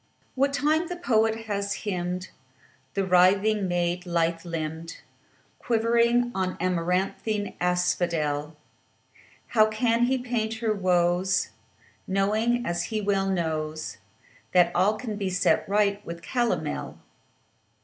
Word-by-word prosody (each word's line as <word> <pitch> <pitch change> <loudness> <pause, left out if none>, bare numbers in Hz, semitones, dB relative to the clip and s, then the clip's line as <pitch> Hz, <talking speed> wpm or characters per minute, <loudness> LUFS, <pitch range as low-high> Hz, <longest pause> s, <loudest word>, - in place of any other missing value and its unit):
What 275 +1 +1
time 310 +4 +1
the 355 - -4
poet 225 -9 +1
hath 200 -2 -2
hymned 180 -2 -3 0.6
The 195 - +1
writhing 190 +3 +4
maid, 175 0 -1
lithe 165 -1 0
limbed, 165 -1 -5 0.6
Quivering 235 +1 +2
on 185 -1 -2
amaranthine 185 +4 -1
asphodel, 170 -4 0 0.9
How 215 -2 +5
can 230 +2 +2
he 260 +2 +1
paint 235 -3 -2
her 220 -1 0
woes, 180 - +1 0.6
Knowing, 215 +5 +1
as 170 +4 -2
well 195 -1 +1
he 190 - +1
knows, 155 -2 -3 0.6
That 175 -1 +4
all 195 +4 +3
can 215 -3 -5
be 195 -2 -2
set 185 +1 +1
right 205 0 +1
with 170 0 -8
calomel? 245 -2 -2
195 Hz, 115 wpm, -26 LUFS, 175-225 Hz, 0.9 s, How